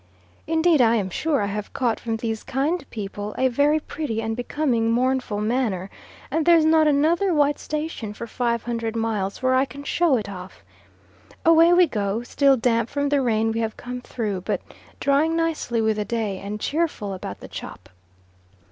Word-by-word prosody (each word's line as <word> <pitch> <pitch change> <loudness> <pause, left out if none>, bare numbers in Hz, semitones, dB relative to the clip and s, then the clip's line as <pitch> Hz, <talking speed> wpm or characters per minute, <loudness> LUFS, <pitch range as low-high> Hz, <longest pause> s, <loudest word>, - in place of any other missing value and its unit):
Indeed 320 -2 +3
I 230 -1 +5
am 195 -4 -1
sure 295 - 0
I - - +1
have 205 +1 -5
caught 240 -4 0
from 225 -1 -3
these 225 -1 -3
kind 280 +5 -1
people 205 -1 -6
a 260 0 +3
very 285 +5 +2
pretty 295 -7 -4
and 225 0 -2
becoming 245 -2 0
mournful 250 -3 0
manner, 215 -5 -1 0.4
and 320 +3 +1
there's 330 -1 +5
not 315 -1 +5
another 320 +7 +2
white 290 -1 +2
station 300 -8 -4
for 235 - -6
500 235 -1 -2
miles 220 -1 -2
where 255 0 +3
I 260 +1 +3
can 275 +2 -10
show 320 -2 +2
it 210 - -4
off. 185 -1 -9 0.8
Away 330 +1 +6
we 355 0 +6
go, 210 -4 -2
still 275 +2 +3
damp 230 -1 +1
from 285 0 -1
the 285 -1 +2
rain 225 -2 +1
we 225 - -2
have 220 -1 -2
come 250 0 -6
through, 210 -6 -3
but - - -2 0.4
drying 295 +4 +2
nicely 325 -8 0
with 220 -1 +1
the 210 - -1
day, 215 -5 -2
and 205 +2 -5
cheerful 295 -9 -1
about 140 - -7
the - - -10
chop. - - -9
245 Hz, 180 wpm, -23 LUFS, 220-295 Hz, 0.8 s, Away